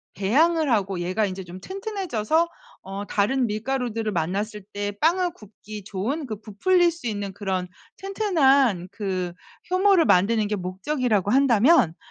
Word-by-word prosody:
배양을 300 - +2
하고 195 -4 0
얘가 185 +5 0
인제 190 -1 -5
좀 180 +1 -10
튼튼해져서 345 - -1 0.4
어 195 +1 -6
다른 240 +5 +1
밀가루들을 225 0 -2
만났을 200 +4 -2
때 205 0 -2
빵을 350 +2 +2
굽기 210 0 -11
좋은, 250 +10 -3
그 215 -3 -5
부풀릴 340 - +2
수 320 -7 -7
있는 205 -2 -4
그런 190 -3 -3 0.3
튼튼한 280 - +2
그 185 -4 -3 0.4
효모를 370 -3 +4
만드는 210 +3 +3
게 210 - -1
목적이라고 205 - -1
한다면 255 - +4
215 Hz, 300 characters per minute, -24 LUFS, 195-300 Hz, 0.4 s, 효모를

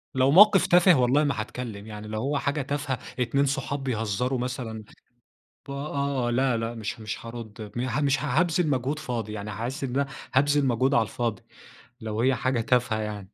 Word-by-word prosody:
لو 130 +1 +4
موقِف 200 +3 +7
تافه 175 +1 +6
والله 130 +5 +3
ما 140 -7 0
هاتكلم، 110 -2 -7
يعني 105 0 -8
لو 110 0 -3
هو 140 +2 0
حاجة 140 +1 -1
تافهة، 140 -2 -2 0.2
اتنين 140 +3 +2
صحاب 140 0 -2
بيهزروا 120 +1 -1
مثلًا 120 -3 -4 0.8
ب - - -7
آه، 140 -2 -2
آه، 120 - 0
لأ، 125 -1 +2
لأ، 115 +1 -3
مش 115 +1 -5
مش 110 +1 -6
هارد 110 -3 -8
مه 125 +3 -1
مش 140 0 +1
هابذل 165 +4 +2
مجهود 140 +2 -1
فاضي 115 -7 -4
يعني، 105 0 -5
هاحس 120 +8 -4
إن 135 - -1
أنا 140 0 +1 0.3
هابذل 145 +1 +3
مجهود 130 +3 +2
على 115 - +4
الفاضي 110 -1 -3 0.6
لو 110 0 -3
هي 130 +1 +3
حاجة 125 0 0
تافهة 120 -2 +1
يعني. 105 -2 -5
125 Hz, 185 wpm, -26 LUFS, 110-140 Hz, 0.8 s, موقِف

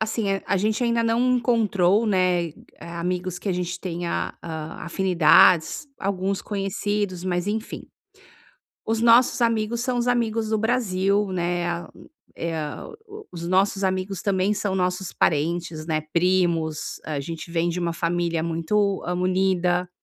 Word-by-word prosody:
Assim, 220 -1 -1 0.2
a 200 - +1
gente 215 +5 0
ainda 235 0 +2
não 240 +2 +2
encontrou, 215 -4 +2
né, 180 -4 +1 0.3
amigos 180 +1 -3
que 200 - -5
a - - +2
gente 180 0 -3
tenha, 175 -1 -3
a 160 -1 -6
afinidades. 180 - +4
Alguns 195 0 -2
conhecidos, 200 -2 -2
mas 180 0 -1
enfim. 220 +2 -4 1.0
Os 225 0 0
nossos 235 +2 +5
amigos 230 0 +1
são 250 0 -1
os 240 - 0
amigos 225 -2 0
do 220 - +1
Brasil, 205 -3 +1
né, 175 -1 -1
ah 170 0 -4 0.5
eh 165 0 -3
ah, 150 -2 -5 0.2
o 425 0 -11
os 170 0 -6
nossos 195 +2 +2
amigos 185 0 -2
também 195 +1 +1
são 200 -2 -2
nossos 185 0 -1
parentes, 160 +1 0
né, 155 -2 0
primos, 170 -3 +1
a 155 -2 -3
gente 165 +3 -7
vem 170 0 0
de 170 +1 -2
uma 170 -1 -1
família 170 -1 -1
muito, 190 +5 0
hã, 180 - -1
unida. 180 -1 +1
185 Hz, 145 wpm, -24 LUFS, 170-210 Hz, 1.0 s, nossos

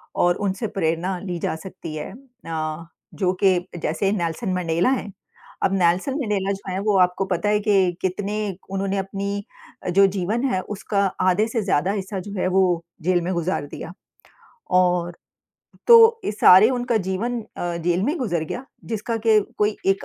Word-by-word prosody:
और 175 0 +3
उनसे 195 +4 -2
प्रेरणा 170 +3 0
ली 180 -2 -4
जा 160 - -2
सकती 165 -2 -8
है 150 +3 -5
अ, 165 - -6 0.3
जो 185 -2 0
कि 190 -2 +5 0.2
जैसे 195 +5 0
नेल्सन 185 +1 -2
मंडेला 175 +2 +1
हैं। 230 -6 -2 0.5
अब 190 - +2
नेल्सन 180 +8 +2
मंडेला 200 -5 -1
जो 195 -1 -7
हैं 185 - -2
वो 205 - +3
आपको 180 +1 +2
पता 185 +2 -1
है 210 - +3
कि 195 -4 +3
कितने 195 +2 -2 0.4
उन्होंने 195 0 -1
अपनी 200 +1 -3 0.5
जो 195 +2 +6
जीवन 215 +8 -1
है 185 - +1 0.2
उसका 200 0 0 0.2
आधे 205 +4 +2
से 225 -1 -1
ज़्यादा 190 -2 +1
हिस्सा 195 -1 -4
जो 200 +2 -8
है - - +1
वो 190 - +6 0.4
जेल 180 +1 +2
में 180 +2 -2
गुजार 170 -2 -1
दिया 170 - -8 0.8
और 175 -1 +2 0.7
तो 470 -1 +11
अ, 455 - -4
सारे 205 0 +7
उनका 245 -2 0
जीवन 235 +6 -2 0.2
अ, 175 -1 -3
जेल 175 +2 0
में 295 +8 0
गुजर 175 -10 -1
गया 245 +11 -6 0.2
जिसका 225 +1 -3
कि 220 -1 +6 0.2
कोई 210 0 +1
एक 195 0 +2
190 Hz, 170 wpm, -22 LUFS, 175-210 Hz, 0.8 s, तो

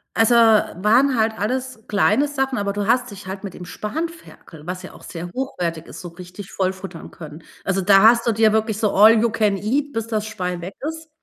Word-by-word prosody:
Also, 225 +1 +4
waren 225 +3 +4
halt 220 0 +2
alles 255 +1 -3
kleine 235 +7 +2
Sachen, 270 -2 -2
aber 200 0 -2
du 205 0 -3
hast 250 0 +1
dich 200 -1 -11
halt 190 +1 -6
mit 195 -3 -6
dem 180 - -9
Spanferkel, 310 - -7
was 180 +1 -5
ja - - -11
auch - - -15
sehr 175 +1 -7
hochwertig 175 - -4
ist, 125 +7 -10
so 180 - -7
richtig 180 +3 -11
voll 190 -1 -1
futtern 190 0 -10
können. 155 -1 -11 0.2
Also 195 0 0
da 195 +1 +5
hast 235 +1 +5
du 235 - +3
dir 220 0 +3
wirklich, 220 -1 0
so, 215 -3 +1
„all 220 +2 +7
you 235 - +2
can 215 -3 +1
eat, 275 +8 -1
bis 225 0 -3
das 215 -2 -2
Schwein 180 -5 -4
weg 185 +3 -7
ist”. 320 0 -7
215 Hz, 220 wpm, -21 LUFS, 190-235 Hz, 0.2 s, all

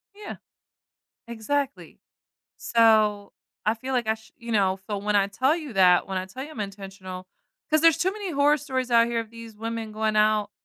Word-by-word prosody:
Yeah. 415 0 -8 0.9
Exactly. 270 +5 -3 0.6
So 215 -3 +3 0.3
I 215 - +2
feel 255 +4 -6
like 245 -3 0
I, 220 - +2
shou 220 0 -18
you 235 -1 -6
know, 195 -3 +2
so 205 -1 -2
when 210 +1 0
I 200 -1 +3
tell 255 +9 +1
you 305 -6 -7
that, 180 -2 +5
when 190 - -3
I 185 - -3
tell 255 +8 -8
you 300 - -11
I'm 250 - -8
intentional, 195 -2 -7 0.4
cause 310 0 +4
there's 330 0 +5
too 370 +4 +1
many 410 -3 -5
horror 290 +1 +4
stories 260 -3 -3
out 230 -1 +5
here 235 -1 -1
of 225 -1 -8
these 230 -1 -11
women 225 0 -5
going 215 0 -1
out, 215 -1 +2
225 Hz, 195 wpm, -25 LUFS, 205-260 Hz, 0.9 s, that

